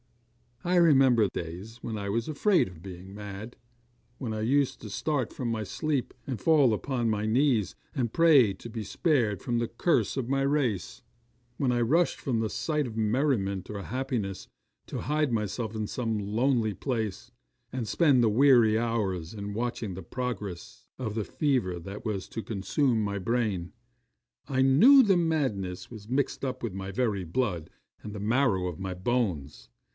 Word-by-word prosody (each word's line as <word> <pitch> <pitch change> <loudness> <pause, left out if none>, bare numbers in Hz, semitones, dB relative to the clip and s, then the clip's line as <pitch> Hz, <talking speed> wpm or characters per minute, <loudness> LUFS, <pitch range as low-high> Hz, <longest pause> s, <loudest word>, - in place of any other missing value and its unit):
'I 180 +1 +1
remember 135 -9 +5
days 90 +8 -6
when 115 - -3
I 100 -1 -4
was 115 +3 -1
afraid 175 - +2
of 90 -3 -12
being 95 0 -9
mad; 105 +3 -7 0.6
when 120 -5 -4
I 110 - -3
used 135 +4 +1
to 105 - -8
start 130 +5 -1
from 125 -3 -4
my 110 -2 -1
sleep, 140 +5 -2
and 130 -5 -4
fall 145 -8 +4
upon 120 +1 -1
my 105 -1 0
knees, 115 - +2 0.2
and 120 -5 -1
pray 145 -11 +6
to 115 - -10
be 110 -1 -5
spared 115 - +1
from 120 -1 -1
the 120 - 0
curse 150 +5 +1
of 130 -2 -2
my 135 0 +1
race; 135 -7 0 0.6
when 135 -3 +1
I 120 -1 +1
rushed 165 +9 +2
from 120 -4 -1
the 110 -1 0
sight 150 +5 -1
of 110 -2 -8
merriment 110 - 0
or 100 -1 -5
happiness, 120 -4 -3 0.4
to - - -4
hide 150 0 0
myself 110 0 -2
in 110 -1 -2
some 115 0 -2
lonely 110 +2 +1
place, 110 -4 -3 0.4
and 125 -4 -3
spend 140 -2 +4
the 115 - +4
weary 120 -2 +5
hours 105 -7 -1
in 100 -1 -5
watching 115 -3 -3
the 95 +1 -7
progress 105 -4 -5
of 110 -5 -3
the 110 - -1
fever 125 - 0
that 100 +6 -8
was 100 -4 -2
to 115 - -5
consume 115 +3 0
my 100 0 -2
brain. 100 -4 -1 0.8
I 130 -2 +1
knew 220 - +8
that 195 -5 +4
madness 130 - -1
was 110 -2 -10
mixed 135 +2 -1
up 130 - -4
with 115 -5 -3
my 95 0 -5
very 105 -3 0
blood, 90 -2 -2 0.3
and 105 - -7
the 105 - -6
marrow 105 -4 +2
of 85 -3 -6
my 95 -1 -4
bones! 90 - -2
115 Hz, 170 wpm, -28 LUFS, 100-130 Hz, 0.8 s, knew